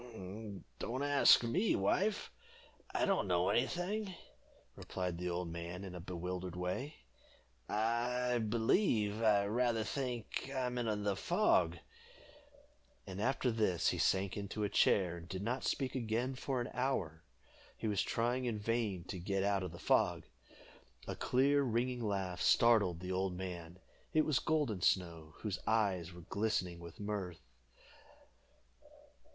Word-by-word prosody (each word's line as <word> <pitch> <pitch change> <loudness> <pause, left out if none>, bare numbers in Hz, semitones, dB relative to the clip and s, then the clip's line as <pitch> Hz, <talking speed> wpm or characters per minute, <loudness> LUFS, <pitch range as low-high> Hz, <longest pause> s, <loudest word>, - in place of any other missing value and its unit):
"Don't 130 +4 -2
ask 145 -3 +6
me, 180 - +2
wife 190 - +1 0.6
I - - +1
don't 195 - +1
know 90 0 +2
any 125 +3 +3
thing," 190 +2 -3 0.6
replied 90 -2 -4
the 90 0 -2
old 85 0 -2
man 85 +2 -6
in 95 -2 -7
a 90 - -6
bewildered 90 0 -5
way. 90 +11 -3 0.7
"I 120 +3 +1
believe 110 - +2
I 105 -3 +4
rather 115 +1 +1
think 125 0 -3
I 130 -1 0
am 125 0 -2
in 110 -3 -1
the 100 -1 +1
fog." 185 - +2 1.3
And 95 0 -6
after 125 +1 +1
this 105 -7 +2
he - - -2
sank 95 0 +2
into 100 +1 -3
a 105 - +1
chair, 90 -4 +3
and 85 0 -11
did 95 +1 -4
not 120 +4 -1
speak 135 -2 -1
again 120 +1 -1
for 130 0 -2
an 120 - -3
hour. 95 - -1 0.5
He - - -3
was 105 -3 +1
trying 120 +2 0
in 115 -3 -1
vain 105 -4 -1
to 90 +1 -6
get 95 +2 -1
out 100 -1 +2
of 90 -2 -4
the 85 - -9
fog. - - +2 0.8
A - - -3
clear, 140 +3 +3
ringing 125 0 0
laugh 95 -4 -2
startled 105 -8 +4
the 90 0 -4
old 95 -1 -1
man; 90 -2 -6 0.4
it 155 0 +4
was 150 -4 +2
Golden 145 - 0
Snow, 85 -4 0
whose 105 -4 -2
eyes 100 -6 +1
were 90 0 -11
glistening 90 -2 -1
with 85 -1 -11
mirth. 100 -5 -4
105 Hz, 145 wpm, -35 LUFS, 90-125 Hz, 1.3 s, ask